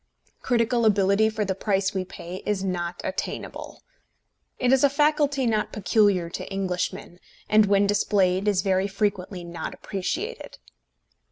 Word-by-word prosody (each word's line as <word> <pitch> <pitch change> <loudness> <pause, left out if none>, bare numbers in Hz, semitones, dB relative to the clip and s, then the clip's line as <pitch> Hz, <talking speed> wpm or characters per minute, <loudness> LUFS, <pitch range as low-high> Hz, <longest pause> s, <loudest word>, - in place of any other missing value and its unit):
Critical 235 -1 +1
ability 205 0 +3
for 215 -1 -2
the 190 - -1
price 195 +1 0
we 190 -1 -1
pay 180 0 -8
is 200 0 -2
not 175 -2 -3
attainable. - - -5 0.7
It 250 0 +2
is 265 - +3
a 285 - +6
faculty 290 -1 +2
not 220 -2 0
peculiar 200 -3 +2
to 170 - -7
Englishmen, 180 -2 -3 0.3
and 215 -1 +5
when 200 0 +4
displayed 200 -1 +1
is 195 -3 +2
very 190 0 +1
frequently 200 -2 -2
not 170 0 -6
appreciated. 195 -3 -5
200 Hz, 140 wpm, -25 LUFS, 185-220 Hz, 0.7 s, a